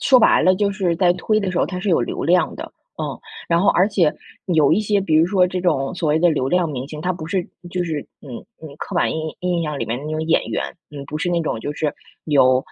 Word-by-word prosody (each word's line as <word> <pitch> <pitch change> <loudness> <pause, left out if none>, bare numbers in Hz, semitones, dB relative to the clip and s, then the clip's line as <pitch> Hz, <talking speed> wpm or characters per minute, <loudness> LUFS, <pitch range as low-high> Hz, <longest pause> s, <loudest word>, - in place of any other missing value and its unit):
说 260 -2 +5
白 225 - +4
了， 185 0 +4
就 200 0 +1
是 190 -4 0
在 175 0 +4
推 215 +4 0
的 195 -3 -2
时 180 - -1
候 - - +3
他 185 - -5
是 190 - -3
有 170 - +3
流 120 - -3
量 175 +3 +3
的， - - -6 0.3
嗯， - - -2 0.4
然 170 0 +3
后 - - +3
而 185 +3 +4
且 180 -7 +2 0.3
有 160 -6 +3
一 195 - +3
些， 205 -1 +1
比 185 -5 0
如 160 +1 +6
说 185 -1 +3
这 180 0 -3
种 160 -4 0
所 170 -3 -1
谓 150 +1 +3
的 175 - +4
流 135 -4 0
量 180 +1 +2
明 135 -2 -5
星， 150 0 -7
他 180 +3 -1
不 165 -3 -7
是 180 0 -2 0.2
就 180 0 -1
是 160 -3 -2 0.2
嗯 130 -5 -8 0.2
嗯， 155 -3 -10
刻 - - -5
板 - - +2
印 160 0 -4
印 180 -2 -1
象 150 -2 -3
里 - - -3
面 120 +3 -3
的 - - -9
那 155 - -5
种 155 0 -2
演 165 +1 +2
员， - - -2 0.3
嗯， 145 -2 -8
不 150 - -5
是 175 +3 -1
那 170 - +1
种 115 - -3
就 145 - -4
是 150 0 -2 0.3
有， 130 -4 +4
170 Hz, 295 characters per minute, -20 LUFS, 150-185 Hz, 0.4 s, 如